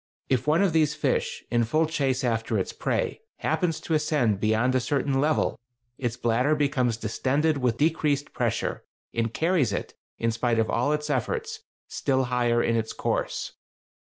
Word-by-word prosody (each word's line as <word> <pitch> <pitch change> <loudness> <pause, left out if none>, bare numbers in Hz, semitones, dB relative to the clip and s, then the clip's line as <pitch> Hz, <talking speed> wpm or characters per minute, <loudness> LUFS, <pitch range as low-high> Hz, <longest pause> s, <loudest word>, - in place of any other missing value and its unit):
If 130 +1 +1
one 160 +6 +4
of 185 -5 +2
these 155 -2 +3
fish, - - -1
in 120 0 +3
full 155 +8 +2
chase 140 -5 0
after 115 -2 0
its - - -2
prey, 485 -2 -2
happens 165 -4 0
to 165 - -3
ascend 150 -9 +2
beyond 110 +4 +2
a 130 - +3
certain 135 +1 0
level, 150 -2 +1 0.4
its 120 -2 -2
bladder 125 +5 +2
becomes 135 -6 +1
distended 140 +7 0
with 125 -3 +1
the 150 - +5
decreased 145 -3 -1
pressure, - - -1 0.3
and 115 -1 0
carries 160 - +1
it, 100 - -4 0.2
in 115 0 0
spite 115 +1 0
of 115 -1 +1
all 125 +5 +1
its 150 0 -1
efforts, 450 -1 -2 0.3
still 130 -2 0
higher 120 -1 +1
in 115 - +1
its 110 -1 -1
course. - - -2
130 Hz, 170 wpm, -26 LUFS, 115-155 Hz, 0.4 s, the